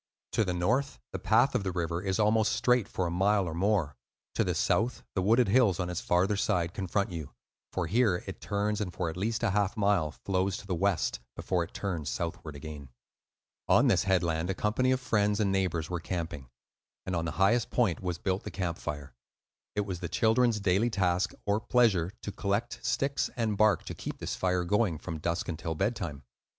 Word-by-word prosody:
To 110 - +2
the 95 - -1
north 125 +11 0
the - - -4
path - - +3
of - - 0
the 95 - -1
river 85 -1 -2
is 95 -1 -1
almost 110 0 +3
straight 125 -4 +2
for 95 - -2
a 85 - -1
mile 95 +2 +2
or 80 - -3
more; 90 -5 +1 0.4
to - - +2
the - - -1
south 120 +3 +1
the 95 - 0
wooded 115 +6 +4
hills 110 -5 +4
on 90 -1 -1
its 90 - -3
farther 90 +4 +2
side 90 -4 0
confront 100 +1 -1
you, 80 -5 -7 0.4
for 95 - -1
here 105 0 +2
it - - -8
turns 105 +1 -1
and 95 -4 -2
for 85 -1 -2
at - - -10
least 110 +5 -2
a 115 - +2
half 105 +2 0
mile 100 -6 +2
flows 95 +3 -1
to - - -10
the 95 - -2
west, 95 +1 0 0.2
before 90 -2 0
it 85 - -11
turns 85 -7 -3
southward 85 -3 -4
again. 70 -1 -8 0.8
On - - +5
this - - +3
headland 85 -3 +1
a 95 - 0
company 115 +6 +1
of 130 0 +2
friends 105 -4 +1
and 100 -2 +2
neighbors 90 -5 0
were 90 0 -3
camping; 80 -6 -5 0.6
and 95 - -2
on 85 -1 -1
the 85 - -3
highest 105 +5 +3
point 110 -10 +1
was 90 -2 -2
built 95 +2 -1
the - - -6
camp 85 -4 -3
fire. 70 -4 -5 0.6
It 105 - +2
was 95 -4 -4
the 85 - -4
children's 115 0 +3
daily 100 +4 +2
task 95 -4 +1
(or 105 +1 +2
pleasure) 110 -7 +2
to 105 - -4
collect 100 +5 -2
sticks 140 +1 0
and 115 -4 0
bark 110 +1 +3
to - - -5
keep - - -6
this - - -4
fire 90 -1 +1
going 100 -2 +1
from 80 0 -6
dusk 85 +2 -2
until 80 -1 -3
bedtime. 95 - -2
95 Hz, 205 wpm, -29 LUFS, 85-105 Hz, 0.8 s, On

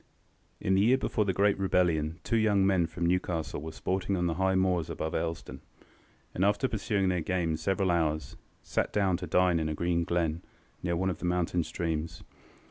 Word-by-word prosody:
In 95 - 0
the 95 - +4
year 120 +5 +5
before 110 -4 0
the 95 - +1
great 100 +1 +2
rebellion 85 -4 +1
two 115 - +1
young 105 -3 +3
men 95 -4 +3
from 85 +1 -3
Newcastle 85 -4 -1
were 80 +1 -6
sporting 95 +2 -2
on 90 - 0
the 85 - +1
high 95 +2 +1
moors 90 -3 +1
above 80 - -3
Elsdon, 80 0 -3 0.7
and, 90 - -1
after 105 +6 +2
pursuing 100 -4 0
their 90 -2 0
game 85 -2 0
several 95 +3 0
hours, 80 -2 0 0.3
sat - - -1
down 100 -3 +2
to 90 0 -6
dine 90 -2 +3
in 80 -1 -1
a 75 - -2
green 85 +1 0
glen, 85 -1 -1 0.4
near 85 -1 -1
one 95 +2 0
of 85 - -6
the - - -4
mountain 90 -1 0
streams. 80 -1 -3
90 Hz, 195 wpm, -29 LUFS, 85-95 Hz, 0.7 s, year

